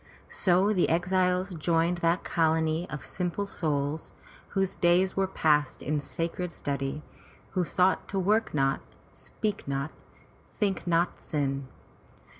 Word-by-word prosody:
*' - - -29 0.2
So 190 +3 +5
the 180 - +2
exiles 180 +2 +1
joined 170 +1 +1
that 170 +1 +2
colony 160 0 +1
of 150 - -6
simple 180 +2 -2
souls, 150 -6 -2 0.3
whose 195 -1 -1
days 180 +2 +3
were 195 0 +2
passed 150 -6 +1
in 150 +1 0
sacred 165 +4 -3
study, 140 -1 -3 0.5
who 185 - +1
sought 180 +3 +2
to 195 - -3
work 210 +4 +2
not, 135 -1 +1 0.3
speak 210 -6 -4
not, 140 +2 -2 0.7
think 195 -4 0
not 170 +1 +1
sin. 140 -3 -2
170 Hz, 130 wpm, -28 LUFS, 150-185 Hz, 0.7 s, So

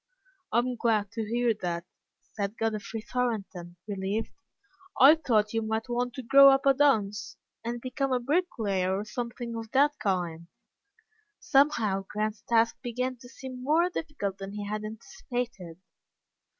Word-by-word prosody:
"I'm 245 +2 +1
glad 215 -4 +1
to 225 - -3
hear 235 +1 +2
that," 170 -1 -2 0.5
said 205 +1 -3
Godfrey 220 0 -2
Thornton, 215 -8 -3
relieved. 200 +2 -2 0.7
"I 275 +4 +10
thought 225 -9 +1
you 225 - +1
might 220 +2 -2
want 245 0 -1
to 260 - -6
grow 275 +3 +8
up 270 0 +3
a 275 - +6
dunce, 225 -7 +1 0.3
and 240 +1 -3
become 260 +2 -2
a 255 - +2
bricklayer 220 - 0
or 205 - -4
something 235 +1 -5
of 225 -1 -6
that 290 +2 +3
kind." 175 -4 -2 0.9
Somehow 220 -9 +2
Grant's 215 0 -2
task 230 -1 +1
began 250 +2 -3
to 245 +1 -14
seem 255 -1 -9
more 330 +6 +3
difficult 250 - -4
than 195 0 -7
he 205 0 -5
had 215 +1 -3
anticipated. 230 - -6
230 Hz, 145 wpm, -28 LUFS, 205-255 Hz, 0.9 s, I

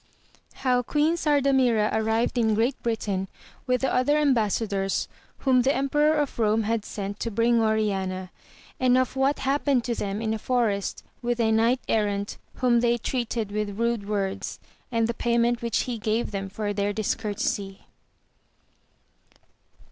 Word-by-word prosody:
— - - -30
How 250 -1 +3
Queen 295 +6 +1
Sardamira 270 -8 +2
arrived 220 +2 +1
in 220 -3 +2
Great 235 +5 0
Britain 205 -5 -2 0.4
with 250 -1 +1
the 265 - 0
other 275 +4 +3
Embassadors 215 -8 +1 0.3
whom 255 -2 +4
the 265 +3 +2
Emperor 295 +3 +2
of 295 -2 -1
Borne 220 -1 +2
had 225 0 -1
sent 200 0 -5
to 230 - -2
bring 230 +1 +2
Oriana, 195 -4 -1 0.5
and 255 -1 +4
of 255 0 0
what 270 +2 +2
happened 275 -2 +1
to 240 - -1
them 205 -2 -3
in 220 -1 -1
a 220 - -3
forest 220 -5 -1 0.2
with 240 -1 -1
a 225 -1 +3
Knight 230 +3 +3
Errant 205 -2 -1 0.2
whom 245 -2 +3
they 240 0 +2
treated 235 -3 -2
with 205 -1 -3
rude 230 -3 -1
words, 195 -2 -2 0.3
and 230 -1 +2
the 235 - -1
payment 235 +1 +1
which 235 -2 0
he 240 -3 -4
gave 220 +2 -1
them 195 -1 -4
for 205 +1 -3
their 205 0 -1
discourtesy. 205 -2 -2
230 Hz, 155 wpm, -25 LUFS, 210-250 Hz, 0.5 s, whom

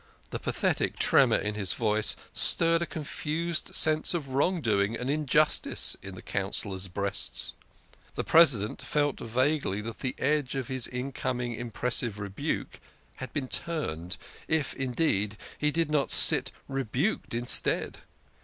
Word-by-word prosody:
The - - -4
pathetic - - -1
tremor - - +4
in 105 - -3
his 100 -3 -1
voice 110 -2 +2 0.2
stirred 165 0 +3
a 170 - -2
confused 160 +2 -3
sense 155 +2 +4
of 145 -5 -4
wrong 145 +7 0
doing 105 -4 0
and 125 +3 -3
injustice 150 0 +1
in 95 -1 -9
the - - -12
Councillors' 95 -1 -2
breasts. 95 -10 -1 0.6
The - - -2
President 130 -11 +3
felt 145 -2 -1
vaguely 130 -2 -1
that 115 +1 -8
the 130 - -4
edge 145 -1 -1
of 130 -3 -4
his 130 -2 +2 0.2
coming 125 -1 -3
impressive 120 -1 -2
rebuke 100 -1 -5 0.4
had 130 - -8
been 145 -4 -3
turned, 95 - -3 0.3
if, 160 -4 -1
indeed, 125 -6 -1 0.2
he 150 - +1
did 160 0 -1
not 145 -2 +1
sit - - +6 0.2
rebuked 135 - -2
instead. 120 +1 +4
130 Hz, 135 wpm, -27 LUFS, 105-150 Hz, 0.6 s, sit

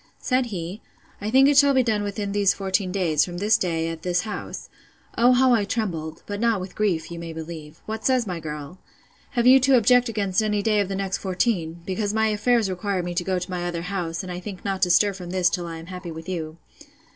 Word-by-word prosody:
Said 255 -1 0
he, 185 -1 -5 0.4
I 210 - -2
think 265 +4 +6
it 285 -1 +3
shall 280 -1 +5
be 260 - +4
done 220 -3 0
within 205 0 -3
these 200 -1 +2
fourteen 190 -1 -1
days, 170 -6 +2
from 175 -1 -5
this 205 +4 +3
day, 165 -3 0
at 165 -1 -5
this 180 0 0
house. 215 -2 -6 0.5
O 240 +2 +5
how 255 0 +4
I 225 -3 +3
trembled! 175 -8 -3
but 205 0 -5
not 230 -2 +2
with 185 0 -7
grief, 180 -7 -1
you 170 - -6
may 165 -1 -6
believe—What 160 +6 -7
says 255 -3 +2
my 180 -4 -4
girl? 150 +2 -7 0.5
Have 240 -3 +1
you 260 +2 +8
to 260 0 +5
object 245 +2 +4
against 200 -3 0
any 210 -1 0
day 215 -1 +2
of 200 -2 0
the 195 - -2
next 190 -1 -2
fourteen: 180 -4 -1
because 205 +3 -2
my 220 0 +2
affairs 220 +1 +2
require 190 0 -2
me 175 0 -4
to 175 +1 -1
go 185 0 0
to 180 +1 -5
my 175 -1 -2
other 170 -1 -3
house, 175 -2 -3
and 185 - -6
I 175 - -4
think 190 0 -8
not 195 -1 -2
to 180 - +3
stir 200 +3 +4
from 180 -2 -8
this 180 -1 +2
till 175 -2 -2
I 165 -1 -6
am 165 - -9
happy 180 0 -7
with 160 +1 -8
you? 165 -3 -4
190 Hz, 240 wpm, -24 LUFS, 175-215 Hz, 0.5 s, you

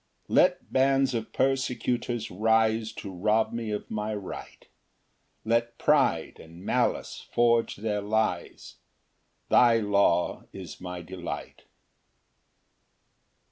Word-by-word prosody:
5 - - -41
Let - - +3
bands 135 0 +3
of 115 -2 -3
persecutors 125 -3 -1
rise 110 +2 +2
To 100 -3 -7
rob 110 +5 +1
me 115 -2 -3
of 105 -1 -4
my 105 0 -2
right, 100 -3 -8 0.8
Let 115 +1 0
pride 140 - +2
and 85 +3 -13
malice - - -1
forge 115 -1 +2
their 105 0 -2
lies, 105 -4 -2 0.7
Thy 120 -2 +6
law 100 -5 +1
is - - -9
my 90 -1 -6
delight. 90 0 -7
110 Hz, 105 wpm, -27 LUFS, 100-120 Hz, 0.8 s, Thy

